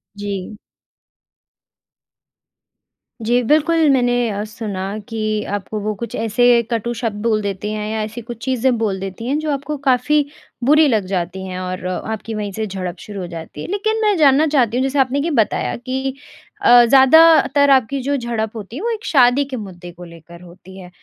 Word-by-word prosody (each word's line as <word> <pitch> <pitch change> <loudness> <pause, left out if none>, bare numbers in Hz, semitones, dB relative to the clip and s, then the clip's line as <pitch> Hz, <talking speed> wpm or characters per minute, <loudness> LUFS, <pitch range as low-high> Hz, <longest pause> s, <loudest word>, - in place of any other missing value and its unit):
जी। 205 0 -5 2.7
जी, 245 +2 +2
बिल्कुल 310 +3 +3
मैंने 245 -2 +2
अ, 205 0 -3
सुना 210 -3 -6 0.3
कि 215 -1 -2
आपको 205 +2 -5
वो 215 +1 -2
कुछ 235 - -5
ऐसे 235 +2 +3
कटू 235 +1 -1
शब्द 220 -3 -4
बोल 220 -2 +1
देते 200 +1 -4
हैं 215 0 -4
या 220 -1 -2
ऐसी 225 +3 -6
कुछ 230 0 -9
चीज़ें 255 -1 +1
बोल 205 -4 -1
देती 195 +5 -6
हैं 285 +3 0
जो 310 -1 -2
आपको 285 +2 -3
काफ़ी 285 +4 +2 0.4
बुरी 300 +3 +5
लग 215 -7 +1
जाती 185 0 -3
हैं 185 0 -5
और 185 0 -5
अ, 185 0 -2
आपकी 220 +1 -5
वहीं 210 -2 -4
से 220 +3 -3
झड़प 185 -2 -5
शुरू 205 -2 -8
हो 175 - -5
जाती 165 -3 -9
है। - - -6
लेकिन 435 +2 -1
मैं 415 -2 +3
जानना 295 +1 +4
चाहती 250 -5 +1
हूँ 260 - +1
जैसे 270 +1 0
आपने 265 +2 +1
ये 325 +3 -1
बताया 220 -6 0
कि 260 +2 -4 0.5
अ, 245 -9 +7
ज़्यादातर 285 +2 +5
आपकी 270 0 +3
जो 285 +2 -1
झड़प 230 -2 -3
होती 215 +1 -8
है 305 - -5
वो 470 - -1
एक 440 -1 -5
शादी 260 0 +4
के 265 -2 -6
मुद्दे 180 -4 -9
को 175 +1 -13
लेकर 170 0 -14
होती 180 +2 -14
है। 180 -2 -11
230 Hz, 190 wpm, -19 LUFS, 200-270 Hz, 2.7 s, अ